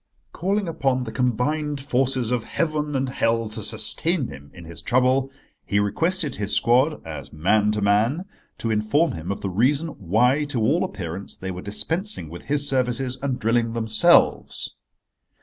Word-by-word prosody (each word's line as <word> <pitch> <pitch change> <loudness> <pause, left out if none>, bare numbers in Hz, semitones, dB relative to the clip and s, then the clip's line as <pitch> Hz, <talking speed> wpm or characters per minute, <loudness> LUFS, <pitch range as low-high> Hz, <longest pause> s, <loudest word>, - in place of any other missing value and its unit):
Calling 195 +3 -1
upon 135 -5 0
the 115 - -6
combined 140 +5 0
forces 130 -3 0
of 125 -3 0
heaven 150 -3 -2
and 135 0 0
hell 115 -3 0
to 110 +1 -6
sustain 130 - 0
him 70 0 -11
in 90 -2 -12
his 80 -2 -10
trouble, 130 +2 +2 0.3
he 100 - 0
requested 160 - 0
his 105 -1 -1
squad, 130 +6 +2
as 80 -2 -7
man 105 +7 +2
to 105 -1 -1
man, 110 - +2 0.3
to 115 - -2
inform 110 +10 +2
him 85 +3 -5
of 100 - -4
the 100 - -2
reason 135 - +2
why 125 - +2
to 145 -4 -3
all 145 - +2
appearance 95 - -5
they 95 0 -5
were 90 0 -6
dispensing 160 - -1
with 85 +2 -9
his 145 0 +1
services 130 -1 0
and 135 -2 -1
drilling 115 0 +1
themselves. 110 -1 +3
125 Hz, 165 wpm, -23 LUFS, 105-145 Hz, 0.3 s, themselves